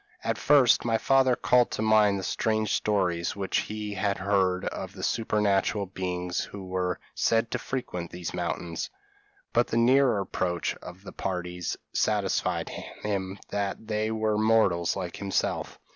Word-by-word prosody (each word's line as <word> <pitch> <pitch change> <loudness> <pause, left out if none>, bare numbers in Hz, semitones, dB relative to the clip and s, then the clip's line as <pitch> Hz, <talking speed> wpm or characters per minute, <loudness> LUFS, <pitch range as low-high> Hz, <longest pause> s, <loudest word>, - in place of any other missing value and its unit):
At - - -1
first, 140 -5 +5
my 115 -1 +2
father 130 0 +4
called 125 0 +3
to 110 - -1
mind 105 -2 +4
the 95 - -4
strange 110 +1 0
stories 90 -5 0
which 100 -1 0
he 105 -1 -4
had 100 0 0
heard 95 -1 +1
of 95 0 -5
the 95 0 -8
supernatural 105 -2 +1
beings 90 -1 -3
who 100 -2 -7
were 90 -1 -2
said 115 0 +1
to - - -1
frequent 90 -10 -4
these 90 -1 -6
mountains; 85 -1 -3 0.6
but 120 - +3
the 115 - -1
nearer 125 -1 +4
approach 90 -3 -1
of 90 +2 -11
the - - -9
parties 90 -2 -3 0.2
satisfied - - 0
him 100 -2 -4
that 100 +2 -2
they 110 0 -1
were 110 -1 0
mortals 110 -6 +3
like 90 -3 -4
himself. 100 -1 -1
100 Hz, 150 wpm, -27 LUFS, 90-110 Hz, 0.6 s, first